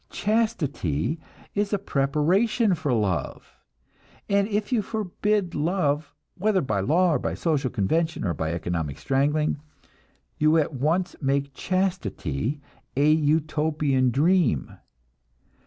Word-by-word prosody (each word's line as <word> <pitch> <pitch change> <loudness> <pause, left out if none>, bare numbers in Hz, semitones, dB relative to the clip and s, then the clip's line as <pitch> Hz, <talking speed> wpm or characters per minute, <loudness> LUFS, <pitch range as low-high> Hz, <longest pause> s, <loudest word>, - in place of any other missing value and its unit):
Chastity 160 - -1 0.3
is 205 0 0
a - - +3
preparation 190 - +1
for 155 -5 -1
love; 100 - -1 0.7
and 200 0 +2
if 210 +1 -2
you 230 - +3
forbid 210 -2 -1
love, 150 -3 0 0.2
whether 200 0 +1
by 105 -7 -1
law, 165 - +3
or 140 - +1
by - - -2
social 150 -6 0
convention, 160 - 0
or 85 - 0
by 80 +1 -2
economic 85 -4 -3
strangling, 145 - +1 0.8
you 155 +2 +4
at 155 -1 +1
once 160 +8 0
make 140 0 0
chastity 150 - -2 0.4
a 145 +2 +5
Utopian 150 -3 +2
dream. 145 - +2
155 Hz, 115 wpm, -25 LUFS, 135-185 Hz, 0.8 s, a